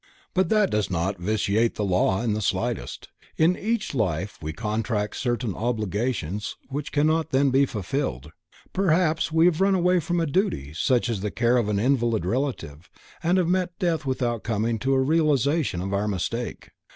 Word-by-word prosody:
But 185 -2 +2
that 210 -3 +3
does 105 -1 0
not 95 +1 -1
vitiate 110 +3 +1
the 105 - -1
law 95 +2 +1
in 115 -3 +1
the 105 - -2
slightest, 95 - -2 0.3
in 165 +3 +4
each 220 -1 -2
life 100 - -1
we 80 0 -4
contract 105 +1 -2
certain 120 -4 -1
obligations 105 -3 -2
which 145 +1 -4
cannot 155 +2 +2
then 135 -1 +2
be 135 +1 +4
fulfilled. 90 - -3 0.4
Perhaps 165 -4 +2
we 160 +1 +4
have 175 0 +3
run 195 0 +4
away 180 0 +3
from 175 +1 -1
a 165 - +1
duty 145 - -1
such 125 - +1
as 115 -5 -2
the 105 - -1
care 120 +3 +2
of 115 -4 +1
an 105 - +1
invalid 115 -4 +1
relative 90 - -3 0.3
and 175 +3 +2
have 180 -3 +2
met 180 -1 0
death 170 -6 0
without 125 -4 -1
coming 115 0 -1
to 135 +3 +1
a - - +3
realization 145 - +2
of 95 +2 -3
our 100 +2 0
mistake. 105 +5 -3
120 Hz, 175 wpm, -25 LUFS, 105-160 Hz, 0.4 s, in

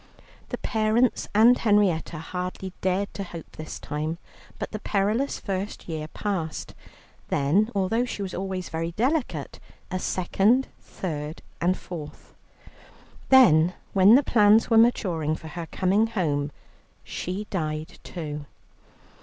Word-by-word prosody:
The - - -3
parents 220 +2 +1
and 230 +4 +7
Henrietta 200 -7 +2
hardly 180 +3 -5
dared 190 +2 0
to 200 - -4
hope 170 -3 -9
this 155 - -7
time. 155 +2 -3 0.4
But - - -5
the 215 - -4
perilous 215 +8 0
first 195 +1 -4
year 155 -2 -4
passed, 165 -3 -4 0.5
then, 170 +11 +2
although 220 +5 +1
she 210 -4 -4
was 190 - -5
always 190 -1 -4
very 165 +1 -3
delicate, 240 - -1 0.3
a 185 - -1
second, 200 +9 +2
third, 150 -3 -6 0.2
and 180 +2 +2
fourth. 155 -4 -9 1.0
Then, 180 - +6 0.2
when 195 +3 +7
the 280 - +5
plans 215 -1 +4
were 225 - +6
maturing 175 -10 +2
for 160 - -9
her 165 +1 -6
coming 195 +7 +2
home, 150 -9 -1 0.5
she 190 +4 -4
died 155 -3 -3
too. 150 -4 -6
185 Hz, 130 wpm, -26 LUFS, 160-215 Hz, 1.0 s, and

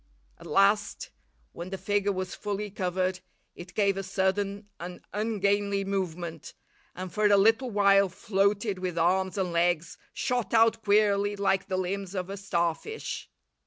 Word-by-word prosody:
At - - -11
last, 200 +1 +2 0.4
when 175 +2 -7
the 195 - -4
figure 205 +2 0
was 185 -1 -4
fully 205 0 -4
covered, 185 -1 -1 0.4
it 175 +1 -11
gave 200 -2 +2
a - - -1
sudden 195 +1 -1
and 175 +1 -7
ungainly 200 -2 0
movement, 175 -4 -4 0.4
and 185 -1 -6
for 210 +2 +3
a 205 -1 +5
little 225 +5 +4
while 200 -2 +4
floated 200 +1 0
with 180 -2 -3
arms 185 +3 +1
and 185 -2 0
legs 170 -1 0
shot 245 -2 -1
out 225 0 +4
queerly 205 0 +3
like 195 -1 +1
the 190 -2 -1
limbs 190 +1 -3
of 185 0 -3
a 200 - -5
starfish. 190 - -3
195 Hz, 150 wpm, -28 LUFS, 185-205 Hz, 0.4 s, a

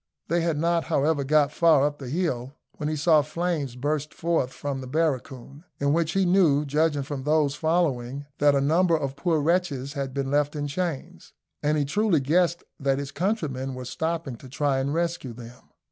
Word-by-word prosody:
They 170 +1 +2
had 165 -2 0
not, 170 +1 +1
however, 150 -2 +1
got 145 +1 +3
far 155 -3 +4
up 145 0 -2
the 130 -3 -7
hill 140 -5 -2 0.2
when 150 - -2
he 155 - -1
saw 155 +1 +4
flames 155 -4 -2
burst 150 +3 -2
forth 165 -6 0
from 140 -1 -4
the 130 - -7
barracoon, 140 -1 -2 0.2
in 140 0 +2
which 165 -1 +1
he 195 -1 +2
knew, 170 -6 +4
judging 150 0 +1
from 140 -1 -5
those 150 0 +2
following, 145 -5 0
that 145 -1 +4
a 140 - +2
number 165 +4 +3
of 140 -3 -3
poor 165 +1 +1
wretches 145 -4 0
had 140 -3 -3
been 135 0 -3
left 145 +1 +1
in 145 -1 -2
chains, 165 -1 -4 0.3
and 150 +1 +1
he 145 - +1
truly 205 +2 +2
guessed 170 +5 +1 0.2
that 135 -1 +1
his 140 0 -5
countrymen 140 - -2
were 130 0 -7
stopping 160 -1 -3
to 130 - -13
try 140 0 0
and 140 +3 -1
rescue 170 -7 -2
them. 120 +1 -13
145 Hz, 190 wpm, -25 LUFS, 135-165 Hz, 0.3 s, far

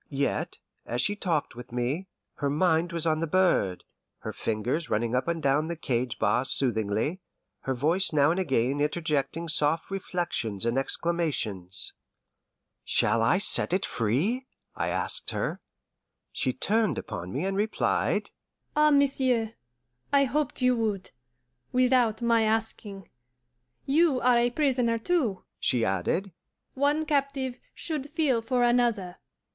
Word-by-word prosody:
Yet, 140 -1 -2 0.3
as 120 - -4
she 205 +10 +1
talked 170 - -2
with 120 0 -10
me, 125 +10 -2 0.3
her 140 - -1
mind 165 +3 +2
was 170 -1 -2
on 155 -1 +1
the 165 - -1
bird, 165 - +2 0.4
her - - -5
fingers 120 +9 -2
running 115 +2 0
up 125 +3 0
and 170 -1 -2
down 145 +3 +2
the 170 - -3
cage 125 -6 -2
bars 110 +5 +1
soothingly, 115 - 0 0.4
her 135 - -3
voice 165 +9 +2
now 145 0 +4
and 175 - -1
again 135 -4 0
interjecting 150 +1 -1
soft 155 +2 +2
reflections 170 - -3
and 115 +1 0
exclamations. 135 - 0 0.9
"Shall 115 +2 +2
I 115 +10 +3
set 190 -2 +3
it 185 - +1
free?" 155 - -1 0.3
I - - -2
asked - - 0
her. - - -3 0.7
She - - -1
turned 215 - +1
upon 90 +1 -6
me 145 +8 -2
and 195 0 -1
replied, 210 +2 0 0.4
"Ah, 300 0 +5
monsieur, 265 -6 +2 0.6
I 280 -1 +5
hoped 275 0 -1
you 250 0 +4
would 210 -4 -2 0.6
without 250 -3 +2
my 230 -1 +3
asking. 220 -3 -2 0.8
You 295 -1 +3
are 245 -1 +4
a 240 +1 +2
prisoner 250 -4 +1
too," 230 - -1 0.2
she 120 -3 +2
added; 95 - -1 0.4
"one 290 +3 +1
captive 275 -4 -1 0.2
should 295 -4 -4
feel 295 -6 +1
for 245 +1 0
another." 235 -7 +1
180 Hz, 140 wpm, -27 LUFS, -, 0.9 s, Ah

